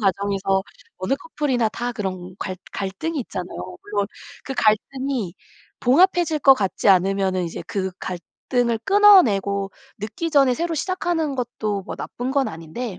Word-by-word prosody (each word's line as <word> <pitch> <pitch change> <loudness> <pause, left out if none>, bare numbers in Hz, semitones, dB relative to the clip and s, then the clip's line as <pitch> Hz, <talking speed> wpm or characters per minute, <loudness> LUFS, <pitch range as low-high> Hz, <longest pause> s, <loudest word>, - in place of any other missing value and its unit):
과정에서 195 -1 +1 0.3
어느 185 +9 0
커플이나 275 -6 -1
다 240 +2 -4
그런 185 -4 -5
갈 185 -1 -4 0.2
갈등이 200 +12 -3
있잖아요. 90 - -6
물론 205 -1 -1 0.4
그 270 - -4
갈등이 230 -2 0 0.5
봉합해질 335 +4 +4
것 270 -1 +8
같지 205 -3 0
않으면은 190 -1 +3
이제 165 - -5
그 190 -2 -2
갈등을 235 +6 -2
끊어내고 215 - +5 0.3
늦기 220 +11 -4
전에 275 -4 +4
새로 335 +3 -2
시작하는 330 -3 -1
것도 215 -5 -2
뭐 - - -6
나쁜 245 +2 -4
건 275 -1 +1
아닌데. 170 +6 -6
220 Hz, 310 characters per minute, -22 LUFS, 190-275 Hz, 0.5 s, 것